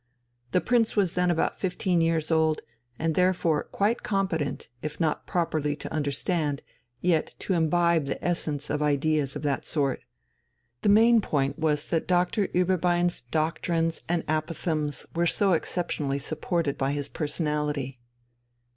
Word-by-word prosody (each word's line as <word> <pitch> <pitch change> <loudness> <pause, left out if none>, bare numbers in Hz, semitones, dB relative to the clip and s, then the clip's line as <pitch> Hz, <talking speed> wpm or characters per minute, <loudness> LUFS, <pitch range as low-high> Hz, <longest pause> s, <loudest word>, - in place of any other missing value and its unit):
The 180 - +3
prince 235 -2 +2
was 195 -5 +2
then 180 0 +2
about 170 -2 0
fifteen 180 -2 0
years 165 -1 +1
old, 160 -1 +2 0.4
and 160 0 0
therefore 175 -3 +2
quite 210 +4 0
competent, 190 -8 -1
if 150 -1 -5
not 160 -3 0
properly 155 -4 0
to 145 - -7
understand, 145 0 -1 0.4
yet 170 -3 +1
to 190 - -2
imbibe 170 -2 +2
the - - -4
essence 150 -4 -2
of 150 +1 -1
ideas 150 -1 +1
of - - -5
that 145 -2 0
sort. 140 -4 -1 0.8
The - - +2
main 225 +2 +6
point 140 -4 -1
was 150 -2 +1
that 165 -2 0
Doctor 180 +4 +2
Ueberbein's 175 -1 +1
doctrines 165 +4 -1
and 175 -1 0
apophthegms 155 -1 -2
were 170 +1 +2
so 195 +2 +3
exceptionally 155 -4 -1
supported 155 +1 -2
by 135 +1 +1
his 145 -1 -2
personality. 150 -4 -2
160 Hz, 140 wpm, -27 LUFS, 150-175 Hz, 0.8 s, main